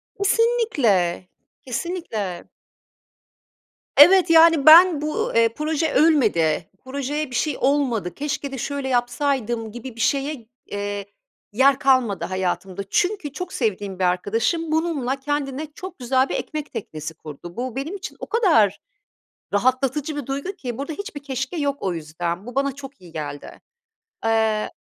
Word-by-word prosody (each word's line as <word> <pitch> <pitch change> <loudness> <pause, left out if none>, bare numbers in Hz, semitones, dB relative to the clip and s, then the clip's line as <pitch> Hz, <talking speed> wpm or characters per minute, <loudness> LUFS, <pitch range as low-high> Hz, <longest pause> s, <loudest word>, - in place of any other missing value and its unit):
Kesinlikle, 380 - +1 0.4
kesinlikle. 235 - -4 1.5
Evet, 360 +5 +8
yani, 325 -3 +6
ben 325 0 +8
bu, 305 0 -2
eee, 230 0 +5
proje 310 +1 -1
ölmedi, 200 - +3 0.2
projeye 280 +2 -3
bir 250 - -5
şey 305 - 0
olmadı, 260 -9 +1
"Keşke 280 -1 -3
de 270 - -5
şöyle 280 +2 -3
yapsaydım." 245 -2 -1
gibi 240 +1 -8
bir 230 - -13
şeye, 275 -1 -1 0.2
eee, 205 0 -4 0.5
yer 265 +4 +4
kalmadı 255 -7 +2
hayatımda. 185 +1 -3
Çünkü 360 - 0
çok 360 +3 -6
sevdiğim 200 -5 -2
bir - - 0
arkadaşım 225 - 0
bununla 305 -5 0
kendine 290 +1 -3
çok 370 -4 -9
güzel 260 +2 +1
bir - - -2
ekmek 305 -1 -4
teknesi 160 -8 -6
kurdu. 160 +2 -11
Bu 250 -1 -4
benim 290 +8 -4
için 395 - -7
o - - -5
kadar 225 - +3 0.7
rahatlatıcı 260 +7 0
bir 290 -4 -5
duygu 280 +8 -3
ki 250 - -6
burada 280 +3 -4
hiçbir 300 -4 -7
"keşke" 265 +3 -4
yok 285 -3 0
o 185 -2 -1
yüzden. 170 +4 -4
Bu 245 - -8
bana 275 0 +1
çok 275 0 -11
iyi 175 -3 -14
geldi. 145 -2 -7 0.6
Eee 220 -1 +1
265 Hz, 140 wpm, -22 LUFS, 210-300 Hz, 1.5 s, Evet